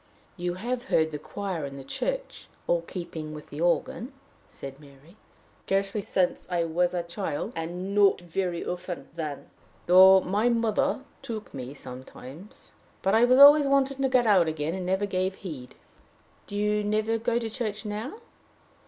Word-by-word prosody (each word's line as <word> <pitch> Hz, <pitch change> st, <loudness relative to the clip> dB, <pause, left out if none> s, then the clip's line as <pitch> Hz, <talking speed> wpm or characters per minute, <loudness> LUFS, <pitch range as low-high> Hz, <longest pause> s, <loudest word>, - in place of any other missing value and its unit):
"You 175 Hz, -1 st, -3 dB
have 240 Hz, +6 st, -3 dB
heard 160 Hz, -10 st, +2 dB
the 150 Hz, -, -5 dB
choir 190 Hz, -4 st, -4 dB
in 140 Hz, -1 st, -6 dB
the 135 Hz, -, -8 dB
church -, -, -4 dB, 0.2 s
all 170 Hz, -1 st, +1 dB
keeping 165 Hz, -3 st, -7 dB
with 150 Hz, -, -11 dB
the 145 Hz, -, -6 dB
organ," 225 Hz, +8 st, 0 dB, 0.3 s
said 135 Hz, 0 st, -9 dB
Mary. 145 Hz, +4 st, -17 dB, 0.5 s
"Scarcely 195 Hz, +2 st, 0 dB
since 185 Hz, -2 st, -1 dB
I 175 Hz, -2 st, +1 dB
was 175 Hz, +2 st, 0 dB
a 175 Hz, -, -1 dB
child 170 Hz, +3 st, -4 dB
and 175 Hz, +4 st, -4 dB
not 200 Hz, -1 st, +5 dB
very 175 Hz, 0 st, -3 dB
often 180 Hz, -4 st, -5 dB
then 155 Hz, -4 st, -5 dB, 0.3 s
though 190 Hz, +2 st, +8 dB
my 205 Hz, +6 st, +1 dB
mother 230 Hz, +1 st, +1 dB, 0.2 s
took 220 Hz, -2 st, -7 dB
me 130 Hz, +1 st, -7 dB
sometimes. 130 Hz, -, -11 dB, 0.3 s
But 195 Hz, -, +2 dB
I 230 Hz, +2 st, +6 dB
was 255 Hz, +1 st, +4 dB
always 285 Hz, +1 st, +9 dB
wanting 275 Hz, 0 st, +2 dB
to 265 Hz, -, +2 dB
get 255 Hz, -2 st, +3 dB
out 190 Hz, -6 st, +5 dB
again, 155 Hz, 0 st, -2 dB
and 185 Hz, -1 st, -4 dB, 0.2 s
gave 185 Hz, 0 st, -1 dB
no -, -, -19 dB
heed." 145 Hz, -10 st, -8 dB, 0.7 s
"Do 205 Hz, -, -7 dB
you 210 Hz, 0 st, +1 dB
never 215 Hz, +2 st, 0 dB
go 235 Hz, +1 st, 0 dB
to 235 Hz, -1 st, -2 dB
church 220 Hz, -2 st, -4 dB
now?" 215 Hz, -, -4 dB
190 Hz, 165 wpm, -27 LUFS, 165-220 Hz, 0.7 s, always